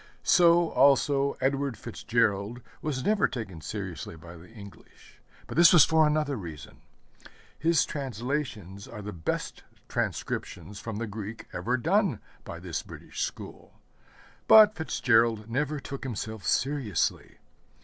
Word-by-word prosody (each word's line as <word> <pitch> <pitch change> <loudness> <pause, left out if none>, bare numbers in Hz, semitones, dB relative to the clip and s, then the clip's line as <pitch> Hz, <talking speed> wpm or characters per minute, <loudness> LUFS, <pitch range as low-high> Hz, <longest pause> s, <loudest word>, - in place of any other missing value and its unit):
So, 170 -1 +5
also, 140 0 +3
Edward 135 -2 0
FitzGerald 115 -1 -1 0.2
was 135 -4 -3
never 210 0 +3
taken 105 -10 -7
seriously 75 - -6
by 85 +2 -12
the 85 +2 -14
English; 100 -3 -15 0.2
but - - -8
this 170 0 +8
was 175 -4 +8
for 160 -1 +4
another 150 -2 0
reason. 80 -7 -10 0.8
His 165 -1 +3
translations 125 - -4
are 105 -3 -9
the 105 +1 -6
best 80 -2 -4 0.3
transcriptions 90 +4 -4
from 115 -2 -6
the 115 - -3
Greek 110 +1 -7
ever 125 +2 -1
done 190 - +1 0.2
by - - -8
this - - -4
British - - -9
school; - - -7 0.7
but 215 -1 +8
FitzGerald 115 - +1
never 145 +5 -1
took 140 0 -7
himself 110 -4 -5
seriously. 130 - -1
125 Hz, 130 wpm, -28 LUFS, 105-150 Hz, 0.8 s, this